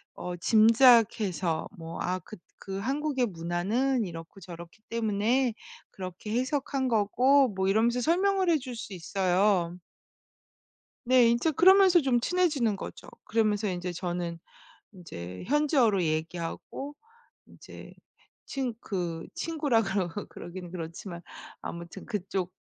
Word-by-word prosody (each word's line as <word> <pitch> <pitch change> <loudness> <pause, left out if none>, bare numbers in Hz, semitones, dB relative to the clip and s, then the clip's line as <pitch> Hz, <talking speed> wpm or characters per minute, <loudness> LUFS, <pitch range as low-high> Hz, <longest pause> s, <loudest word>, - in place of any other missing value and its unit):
어 180 0 -5
짐작해서 220 -4 +4
뭐 165 0 -7
"아, 180 +1 -1
그 215 +5 -12 0.3
그 195 0 -4
한국의 270 +3 0
문화는 205 +8 -1
이렇고 165 +2 -9
저렇기 170 -2 -11
때문에 230 +3 +1 0.4
그렇게 185 +2 -7
해석한 265 0 -1
거고" 255 +5 +3
뭐 190 0 -1
이러면서 230 +5 +2
설명을 375 +6 +2
해 330 - +4
줄 255 -3 -7
수 210 - -7
있어요. 180 0 +1 1.3
네. 250 -1 +6
인제 235 +7 +2
그러면서 375 +3 +6
좀 265 -4 +2
친해지는 285 - +1
거죠. - - -9 0.2
그러면서 215 -1 +1
인제 180 -1 -3
저는 175 -1 -4 0.5
인제 90 - -9
현지어로 270 - +3
얘기하고 165 - -4 0.5
인제 - - -13 0.5
친 265 -3 -3
그 175 -6 -4
친구라 295 -8 +1
그러 195 -3 -1 0.2
그러긴 175 0 -9
그렇지만 170 +1 -7 0.4
아무튼 170 +3 -8
그쪽 190 -4 -3
210 Hz, 260 characters per minute, -28 LUFS, 180-260 Hz, 1.3 s, 네